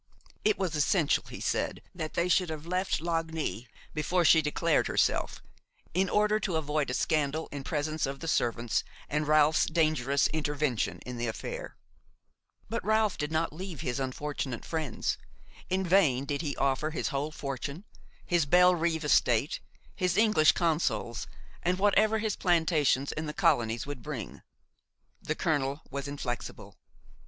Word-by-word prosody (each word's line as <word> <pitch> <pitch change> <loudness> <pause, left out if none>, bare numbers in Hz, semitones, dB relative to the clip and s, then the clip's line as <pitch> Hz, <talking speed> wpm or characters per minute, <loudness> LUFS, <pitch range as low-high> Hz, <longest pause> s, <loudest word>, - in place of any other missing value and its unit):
It 215 -1 +3
was 185 -4 -1
essential, 150 +1 +2
he - - -8
said, - - -1
that 155 -3 -5
they 170 - +2
should 180 -1 +2
have 155 -1 -6
left 185 -1 -1
Lagny 160 -7 -2 0.3
before 170 +3 +1
she 160 +1 +7
declared 155 +2 +1
herself, - - 0 0.5
in 185 +2 +2
order 210 +1 +3
to 190 -6 -2
avoid 150 -2 0
a 125 - -1
scandal 155 0 0
in 145 -1 -5
presence 155 -1 -1
of 135 0 -5
the 165 - -6
servants, 120 -5 0 0.3
and 150 +1 -1
Ralph's 155 +1 +4
dangerous 155 -4 +2
intervention 145 -5 -1
in 125 -1 -6
the 120 0 -2
affair. - - -5 0.9
But 230 - -3
Ralph 215 -2 +2
did 150 +1 -2
not 160 0 0
leave 180 -2 -6
his 125 +2 -2
unfortunate 135 -1 -3
friends. 155 -6 -2 0.5
In 190 +1 0
vain 160 -8 +3
did 140 +1 -2
he 145 -4 -3
offer 140 +3 +1
his 155 - -2
whole 140 +1 -2
fortune, 140 +3 -5 0.4
his 175 -5 +2
Bellerive 170 -1 +4
estate, - - +3 0.4
his 180 -2 0
English 210 -8 +5
consols, 135 - 0 0.3
and 180 +1 +1
whatever 210 +2 +3
his 215 -1 -1
plantations 160 -6 +2
in 155 0 -4
the 150 - -4
colonies 120 - +2
would 145 -3 -6
bring; 135 -8 -6 0.8
the - - -2
colonel 140 -2 0
was 140 +1 -4
inflexible. 130 -4 -5
155 Hz, 150 wpm, -29 LUFS, 140-175 Hz, 0.9 s, she